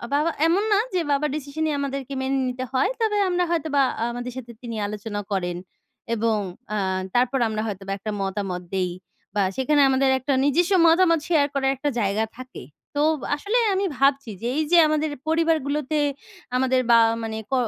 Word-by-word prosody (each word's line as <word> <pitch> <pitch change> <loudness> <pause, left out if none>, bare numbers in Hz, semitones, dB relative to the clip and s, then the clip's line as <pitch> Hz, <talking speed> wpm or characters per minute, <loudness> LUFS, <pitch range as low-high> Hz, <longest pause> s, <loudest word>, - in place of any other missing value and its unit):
বাবা 315 +3 +2 0.2
এমন 380 +5 +2
না 405 - +4
যে 365 - +2
বাবার 295 +1 +1
decision 305 +2 -4
ই - - 0
আমাদেরকে 275 -1 -4
মেনে 270 +1 0
নিতে 255 +1 -4
হয়, 260 - +2
তবে 425 -2 +2
আমরা 355 0 +1
হয়তো 320 -2 0
বা 275 - +5 0.3
আমাদের 245 +1 -5
সাথে 240 -2 -7
তিনি 230 -2 -6
আলোচনা 205 0 -5
করেন। 175 -2 -1 0.6
এবং 225 0 +1 0.4
আ - - 0 0.4
তারপর 250 +2 +2
আমরা 215 0 -2
হয়তো 195 -2 -5
বা - - -3
একটা 215 +2 -5
মতামত 195 -2 -3
দেই 185 -2 0 0.4
বা 205 - +2
সেইখানে 290 +2 +2
আমাদের 265 0 +3
একটা 275 +2 -1
নিজস্ব 335 +7 +2 0.2
মতামত 335 -1 +4
শেয়ার 300 -5 +3
করার 270 -1 +1
একটা 290 +3 -2
জায়গা 210 +2 +1
থাকে। 255 - -9 0.3
তো 290 - +1 0.3
আসলে 410 +10 -1 0.2
আমি 390 +1 0
ভাবছি 275 -3 +2
যে 235 - -2
এই 315 - +2
যে 350 - +7
আমাদের 305 0 0 0.2
পরিবারগুলোতে 310 -3 +1 0.6
আমাদের 260 0 +2
বা 230 - +8 0.3
মানে 220 0 -4
ক - - -1
270 Hz, 180 wpm, -24 LUFS, 225-310 Hz, 0.6 s, বা